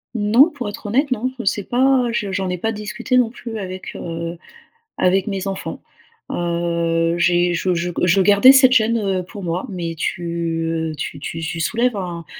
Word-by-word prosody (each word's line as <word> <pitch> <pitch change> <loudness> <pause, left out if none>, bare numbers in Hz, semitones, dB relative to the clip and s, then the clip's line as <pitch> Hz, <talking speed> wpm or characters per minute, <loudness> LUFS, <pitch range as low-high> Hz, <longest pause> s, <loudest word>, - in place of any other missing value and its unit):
Non, 225 +8 +5
pour 270 -9 -5
être 205 - -10
honnête, 265 +7 +1
non. 255 +1 -1
Je - - -3
sais 200 +1 0
pas, 255 +2 +2
je 205 -4 -2
j'en 190 -1 -2
ai 180 - -2
pas 225 +6 -1
discuté 225 +4 -2
non 245 -3 +3
plus 230 -1 -8
avec 185 -1 -7
heu 170 0 -5 0.6
avec 190 +3 +2
mes 195 -2 -3
enfants. 195 -1 -5 0.5
Heu 170 -1 0
j'ai 175 0 +2
je 180 +2 0
je 175 +1 -2
je 180 +2 +4
gardais 205 +7 +7
cette 265 -1 +6
gêne, 230 -1 +3
heu, 195 -4 -1
pour 200 +3 -10
moi. 175 +1 -2
Mais 170 -4 -4
tu 175 +2 -3 0.7
heu, - - -6
tu 145 0 -5
tu 165 +3 -5
tu 165 0 -4
soulèves 235 +6 +1
un 175 -4 -5
195 Hz, 190 wpm, -20 LUFS, 175-230 Hz, 0.7 s, gardais